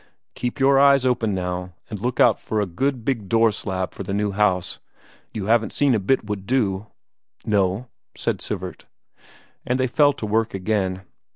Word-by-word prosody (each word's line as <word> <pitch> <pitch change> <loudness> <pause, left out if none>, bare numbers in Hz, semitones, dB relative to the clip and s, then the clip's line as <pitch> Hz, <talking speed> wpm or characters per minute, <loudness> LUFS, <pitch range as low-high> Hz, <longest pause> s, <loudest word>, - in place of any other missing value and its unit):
Keep 125 +2 -4
your 135 0 +5
eyes 140 -1 +5
open 115 -5 +1
now 90 -1 -4
and 105 - -6
look 125 +1 -2
out - - +5
for 110 - -2
a 105 - +1
good 125 +6 -2
big 115 -8 -2
door 115 -1 +4
slab 95 -4 -3
for - - -8
the 100 +1 -3
new 105 0 0
house. 95 -3 0 0.5
You 105 -3 -4
haven't 115 +1 +2
seen 140 -3 +3
a 110 - +2
bit 110 +4 +1
would 100 -2 -5
do?" 105 -5 0 0.6
"No," 100 +3 +1 0.3
said - - -1
Sivert. - - -5 0.8
And 125 +1 -1
they 130 - +3
fell 145 +3 +4
to 110 - -6
work 110 0 0
again. 95 -1 -1
110 Hz, 180 wpm, -23 LUFS, 95-125 Hz, 0.8 s, your